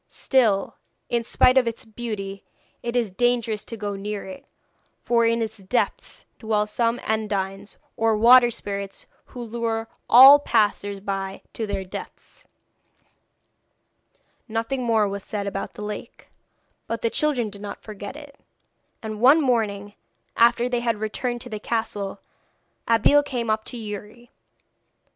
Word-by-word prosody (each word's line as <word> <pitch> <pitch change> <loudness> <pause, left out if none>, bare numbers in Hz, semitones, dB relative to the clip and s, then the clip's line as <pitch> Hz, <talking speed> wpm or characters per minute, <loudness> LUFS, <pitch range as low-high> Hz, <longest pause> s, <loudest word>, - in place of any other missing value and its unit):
Still, 225 -7 +1 0.3
in 235 -1 0
spite 255 +3 +4
of 250 - -1
its 230 0 -4
beauty, 210 -3 -6 0.4
it 240 0 -4
is 235 -5 +1
dangerous 235 0 0
to 230 - -7
go 205 -1 -4
near 205 +1 -5
it, 190 -1 -10 0.6
for 235 -1 +3
in 230 0 +1
its 220 0 -5
depths 245 - -2
dwell 215 -2 0
some 230 +2 0
Undines, 200 -2 -3 0.2
or 225 -1 +2
water 240 +2 +7
spirits, 200 -3 -6 0.2
who 245 - -8
lure 225 -1 -3 0.2
all 270 +4 +10
passers 205 -5 0
by 195 -1 -4
to 220 - -3
their 200 -1 -3
deaths.' 185 - -10 2.0
Nothing 230 +3 -2
more 225 -3 +2
was 200 0 -5
said 205 -2 -4
about 195 0 -5
the 210 - -7
lake, 210 0 -8 0.6
but 230 - -4
the 230 - +1
children 255 -8 0
did 200 0 -10
not 205 -1 -7
forget 205 +2 -8
it, 290 -2 -12 0.6
and 215 -1 -5
one 275 +6 +7
morning, 210 -7 0 0.4
after 235 +1 +4
they 245 -1 0
had 235 -2 0
returned 240 +3 -3
to 245 - -7
the 215 - -4
castle, 205 -3 -3 0.7
Abeille 230 +6 +5
came 245 -6 -2
up 215 0 0
to 245 - -5
Youri. 215 +2 -8
225 Hz, 145 wpm, -24 LUFS, 205-240 Hz, 2.0 s, all